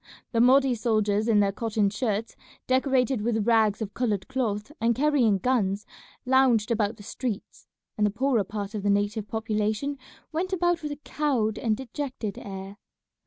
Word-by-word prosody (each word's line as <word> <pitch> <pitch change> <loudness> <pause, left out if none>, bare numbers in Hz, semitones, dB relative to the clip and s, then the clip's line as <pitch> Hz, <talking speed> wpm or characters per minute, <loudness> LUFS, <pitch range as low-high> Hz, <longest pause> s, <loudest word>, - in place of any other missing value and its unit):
The 230 - +2
Mahdi's 255 -1 +4
soldiers 215 -2 +1
in 215 -3 +4
their 200 -1 +2
cotton 210 -1 0
shirts, 215 0 -2 0.3
decorated 260 -2 +2
with 220 -1 0
rags 220 -2 +3
of 200 - -7
coloured 215 -6 -1
cloth, 240 -3 -2
and 230 +1 +3
carrying 265 -7 +3
guns, 205 -3 0 0.4
lounged 250 -4 +3
about 215 -1 0
the 205 - -12
streets, 220 0 -5 0.3
and 210 - +4
the - - +1
poorer 245 0 +1
part 200 +1 -5
of 210 - -3
the 205 - 0
native 205 +1 0
population 220 +5 -1 0.3
went 360 +4 -2
about 350 -1 +1
with 300 -1 -4
a 290 - -6
cowed 245 -8 0
and 220 -3 0
dejected 255 -5 -5
air. 195 0 -8
225 Hz, 165 wpm, -26 LUFS, 210-260 Hz, 0.4 s, Mahdi's